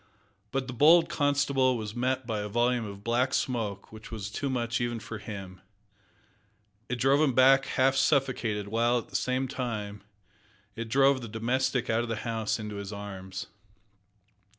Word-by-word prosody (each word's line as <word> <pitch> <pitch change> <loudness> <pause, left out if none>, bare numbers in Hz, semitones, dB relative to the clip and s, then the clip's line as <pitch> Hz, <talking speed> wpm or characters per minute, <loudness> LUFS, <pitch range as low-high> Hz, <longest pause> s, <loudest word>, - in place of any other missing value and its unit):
But 135 +4 -2
the 125 - -6
bold 165 +6 +6
constable 140 -4 +2
was 105 -2 -5
met 130 +1 -1
by 110 -3 -2
a 105 - -3
volume 120 +1 +1
of 100 -1 -9
black 125 +3 +1
smoke 110 -6 -2
which 110 0 -11
was 105 -2 -6
too 140 +4 -2
much 120 -2 -1
even 120 -1 -2
for 110 0 -7
him. 95 -3 -8 1.3
It 125 - 0
drove 135 +4 +3
him 145 -4 +3
back 135 +1 +6
half 135 +1 +2
suffocated, 130 -7 +1
while, 120 +3 +2
at 120 - -5
the - - -11
same 130 +1 0
time, 110 -6 -4 0.7
it 115 -1 -5
drove 135 +2 +4
the 115 - -6
domestic 125 +3 0
out 115 +1 +1
of 120 - -4
the 115 - -1
house 110 -2 -1
into 105 -1 -6
his 100 0 -6
arms. 95 -2 -7
120 Hz, 170 wpm, -28 LUFS, 105-130 Hz, 1.3 s, bold